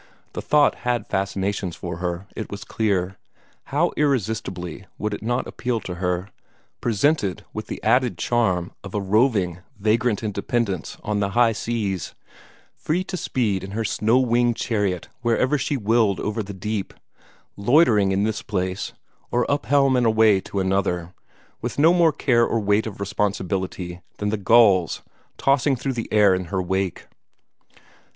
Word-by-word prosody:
The - - -4
thought 150 -1 +3
had 120 -3 0
fascinations 95 -1 -2
for 85 -2 -6
her, 90 +1 -3
it 110 - -5
was 100 0 -6
clear. 95 -4 -1 0.5
How 160 +5 +1
irresistibly 105 - -2
would 105 0 -2
it - - -5
not 120 +3 -1
appeal 125 -2 -2
to 90 - -5
her, 90 +1 -1 0.5
presented 115 - +1
with - - -5
the - - -5
added 125 -7 +2
charm 90 -4 0
of 100 0 -8
a - - +1
roving, 100 -3 +2 0.2
vagrant 110 +1 +1
independence 105 -3 -2
on 105 -1 -1
the 100 -1 0
high 120 -2 +5
seas, 105 -4 -3 0.6
free 175 +4 -1
to 185 - -5
speed 115 - -1
in 95 +1 -7
her 115 - 0
snow 110 +4 +2
winged 120 -2 +2
chariot 100 -8 -1
wherever 125 +4 +2
she 140 +2 -1
willed 110 -3 +2
over 105 +1 -2
the 100 -1 -7
deep, 100 +1 -4 0.6
loitering 105 -3 +4
in 95 +1 +1
this 110 0 -1
place, 95 -2 -3 0.4
or 120 0 +1
up 145 -6 -1
helm 135 0 +4
and 125 -2 +3
away 110 -3 +5
to 100 - -4
another, 95 -2 0 0.5
with 120 - -4
no 160 +4 +6
more 170 -2 +4
care 120 -5 +2
or 115 - +1
weight 105 +1 +1
of 100 - -8
responsibility 95 -3 -2 0.2
than 105 - -1
the 110 - 0
gulls 100 -4 +4 0.3
tossing 135 0 +2
through 130 +2 -3
the 115 -2 -5
air 105 -3 +5
in 90 0 -1
her 95 +2 -2
wake! 95 0 -2
105 Hz, 160 wpm, -23 LUFS, 95-120 Hz, 0.6 s, no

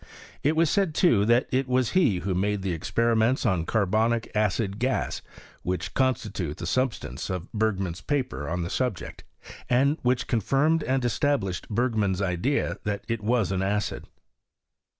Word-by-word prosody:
It 155 +3 +1
is 165 0 +4
said, 190 -6 +1
too, 115 - +4
that 120 +3 +3
it 130 +1 +1
was 125 -2 +1
he 125 - +2
who, 95 +2 -1
made 100 +2 0
the 95 - -1
experiments 115 - +1
on 90 -7 +1
carbonic 110 +3 +1
acid 105 -1 0
^as, 130 +2 -1 0.4
which 90 0 -3
constitute 105 - -1
the - - -5
substance 115 - -2
of 90 0 -3
Bef^man's 95 -5 -1
paper 130 - -2
on 90 +1 -2
the 85 - -4
subject, 125 -8 -3 0.5
and 140 +5 +3
which 125 0 +1
confirmed 140 - +2
and 130 -1 0
established 120 - 0
Berg 120 +3 0
man's 100 -4 0
idea 100 +9 0
that 100 -1 -2
it 115 -2 -2
was 115 -3 +1
an 95 -1 0
acid. 105 +2 -2
110 Hz, 155 wpm, -26 LUFS, 95-130 Hz, 0.5 s, is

